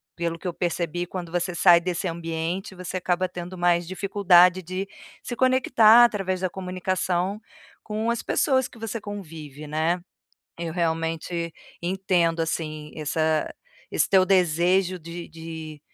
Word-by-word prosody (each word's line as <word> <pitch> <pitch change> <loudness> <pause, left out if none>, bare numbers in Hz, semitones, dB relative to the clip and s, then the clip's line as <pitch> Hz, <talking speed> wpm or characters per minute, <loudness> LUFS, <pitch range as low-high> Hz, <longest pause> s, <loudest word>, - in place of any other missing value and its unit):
pelo 170 -1 -2
que 185 - -6
eu 175 - -2
percebi, 175 0 -2
quando 180 -1 -6
você 175 +1 -1
sai 170 -1 +6
desse 180 +1 -2
ambiente, 165 +3 -4
você 185 0 -5
acaba 185 0 0
tendo 180 +1 -7
mais 175 0 +2
dificuldade 185 -1 +4
de 185 +3 -4 0.4
se 240 - -5
conectar 240 -3 +6
através 195 -5 -1
da 185 - 0
comunicação 185 +1 -2 0.4
com 220 +2 -2
as 235 - -2
pessoas 260 -3 +1
que 245 - -17
você 225 0 -5
convive, 160 -8 -8
né. 160 +4 0 0.6
Eu 170 -1 -3
realmente 165 0 -2 0.3
entendo, 175 -2 +1
assim, 155 -2 -3
essa 155 0 0 0.4
esse - - +2
teu 190 -1 +5
desejo 185 0 +2
de 170 +1 -8
de 160 -2 -8
175 Hz, 140 wpm, -25 LUFS, 165-190 Hz, 0.6 s, sai